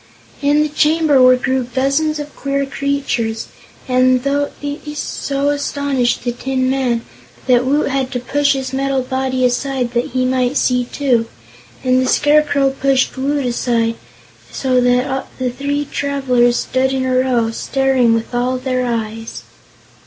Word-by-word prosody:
In 290 +1 +3
the 305 - -2
chamber 300 -2 +3
were 255 0 +7
grouped 255 -1 -2
dozens 280 +4 +1
of 295 0 -7
queer 275 0 -1
creatures, 275 -5 -2 0.4
and 255 0 +3 0.4
these 295 +1 -6
so 280 0 -2
astonished 285 -3 -1
the 240 - -1
Tin 255 +1 -1
Man 250 -4 0 0.4
that 250 -1 +3
Woot 290 +3 +1
had 270 -1 -1
to 250 - -1
push 285 +3 +1
his 265 -1 -4
metal 270 -1 0
body 260 0 -1
aside, 250 0 -1
that 240 0 +1
he 255 0 0
might 255 +1 +1
see, 250 -1 +1
too. 245 -4 0 0.6
And 255 0 +3
the 255 - 0
Scarecrow 290 -2 +3
pushed 270 -1 +1
Woot 275 +1 -1
aside, 235 -1 0 0.6
so 255 -2 +1
that 250 +2 +1
the 255 -1 -1
three 285 +3 -2
travelers 260 -4 +1
stood 265 +1 0
in 260 -1 -1
a 255 0 0
row, 245 -3 +1
staring 260 -1 +1
with 230 +2 -4
all 250 +1 0
their 255 0 -1
eyes. 225 -2 -4
260 Hz, 150 wpm, -17 LUFS, 250-280 Hz, 0.6 s, were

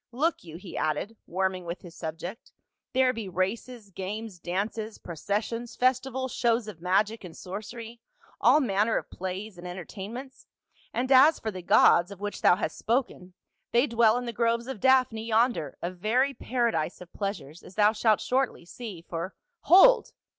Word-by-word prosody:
Look 310 +8 0
you," 165 -1 -9
he 185 0 -10
added, 155 +9 -1
warming 185 +1 -1
with 170 +1 -6
his 175 -2 -11
subject, 170 - -7 0.2
" - - -59
there 260 -1 +4
be 225 -5 -5
races, 205 +4 -3
games, 200 +1 -6
dances, 210 +5 -3
processions, 215 +7 -3
festivals, 260 0 0
shows 230 -1 +1
of 185 -6 -9
magic 205 +5 +1
and 170 -3 -10
sorcery, 225 +5 -8 0.4
all 260 +5 +6
manner 220 -3 +1
of - - -5
plays 190 +1 -6
and 180 - -8
enter 180 -1 -6
tainments; 245 +7 -8 0.4
and 255 +2 -2
as 275 +5 +7
for 220 - -4
the 185 -2 -7
gods, 175 0 +5
of 200 -2 -10
which 205 0 -5
thou - - +6
hast 200 - -4
spoken, 225 -7 -2 0.4
they 240 +3 +5
dwell 230 -2 +3
in 245 - -3
the 235 - -4
groves 235 +1 +1
of 260 -4 -6
Daphne 255 -3 +3
yonder, 225 - +1
a 175 - -1
very 235 +10 +1
paradise 235 -11 -1
of 180 -1 -13
pleasures, 195 -6 -5
as 185 - -14
thou 210 0 +5
shalt 215 -1 +2
shortly 255 -8 -1
see, 195 -3 -8
for—" 170 +2 -5
" 470 -2 -53
Hold - - +7
215 Hz, 175 wpm, -27 LUFS, 185-240 Hz, 0.4 s, as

